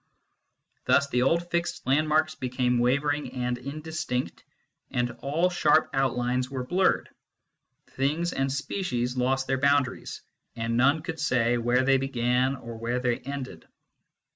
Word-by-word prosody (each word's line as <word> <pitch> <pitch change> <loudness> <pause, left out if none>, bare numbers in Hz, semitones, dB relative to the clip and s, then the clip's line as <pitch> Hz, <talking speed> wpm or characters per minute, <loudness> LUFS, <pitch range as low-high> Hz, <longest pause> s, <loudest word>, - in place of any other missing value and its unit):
Thus 140 - +4
the 125 - +1
old 170 +6 +1
fixed 170 0 -2
landmarks 155 +3 +2
became 125 -1 0
wavering 145 +4 0
and 125 -1 -1
indistinct, 140 - -4 0.5
and 120 0 -1
all 165 +6 +1
sharp 160 -2 +3
outlines 125 -1 0
were 130 -2 -4
blurred. 185 +7 +2 0.8
Things 155 +6 -1
and 135 0 0
species 135 -3 -2
lost 130 +1 +1
their 135 0 0
boundaries, 140 -2 0 0.3
and 115 0 -2
none 140 +6 +3
could 165 -2 -5
say 120 -5 +2
where 120 +2 +2
they 135 +1 +4
began 130 0 +1
or 115 -3 -9
where 120 +2 -1
they 125 0 0
ended. 130 -9 -7
130 Hz, 135 wpm, -27 LUFS, 125-145 Hz, 0.8 s, Thus